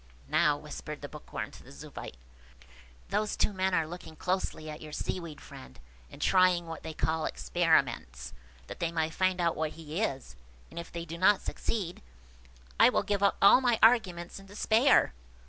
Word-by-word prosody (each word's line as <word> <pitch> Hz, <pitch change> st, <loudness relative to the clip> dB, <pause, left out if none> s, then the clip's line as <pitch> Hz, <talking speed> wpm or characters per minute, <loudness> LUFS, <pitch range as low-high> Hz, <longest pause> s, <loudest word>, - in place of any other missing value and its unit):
"Now," 150 Hz, -1 st, +3 dB
whispered 150 Hz, 0 st, -8 dB
the -, -, -4 dB
Bookworm 150 Hz, +1 st, -7 dB
to -, -, -14 dB
the -, -, -15 dB
Zoophyte, 70 Hz, -2 st, -9 dB, 0.9 s
"those 210 Hz, 0 st, 0 dB
two 210 Hz, -, +1 dB
men 190 Hz, -1 st, +1 dB
are 165 Hz, -, +2 dB
looking 160 Hz, -1 st, -9 dB
closely 180 Hz, -2 st, -2 dB
at 155 Hz, 0 st, -7 dB
your 155 Hz, -, -9 dB
Seaweed 165 Hz, -3 st, -4 dB
friend, 65 Hz, 0 st, -13 dB, 0.3 s
and -, -, -13 dB
trying 185 Hz, -2 st, +4 dB
what 165 Hz, -1 st, -7 dB
they 160 Hz, -1 st, -7 dB
call 160 Hz, +3 st, 0 dB
experiments, 120 Hz, -, 0 dB, 0.3 s
that -, -, -9 dB
they 170 Hz, -1 st, -1 dB
may 160 Hz, -1 st, -1 dB
find 185 Hz, +1 st, +1 dB
out 170 Hz, -1 st, +1 dB
what 155 Hz, -1 st, -2 dB
he 160 Hz, +3 st, -5 dB
is; 135 Hz, -, -3 dB, 0.4 s
and -, -, -7 dB
if 170 Hz, -, -8 dB
they 170 Hz, 0 st, -5 dB
do 170 Hz, +1 st, -7 dB
not 195 Hz, +2 st, +5 dB
succeed, 185 Hz, -6 st, -3 dB, 0.8 s
I -, -, +8 dB
will -, -, +1 dB
give 205 Hz, -1 st, -1 dB
up 200 Hz, -, +3 dB
all 200 Hz, +6 st, +8 dB
my 245 Hz, -3 st, +3 dB
arguments 190 Hz, -7 st, +3 dB
in 195 Hz, -, -15 dB
despair." 220 Hz, -, +3 dB
170 Hz, 180 wpm, -30 LUFS, 155-190 Hz, 0.9 s, I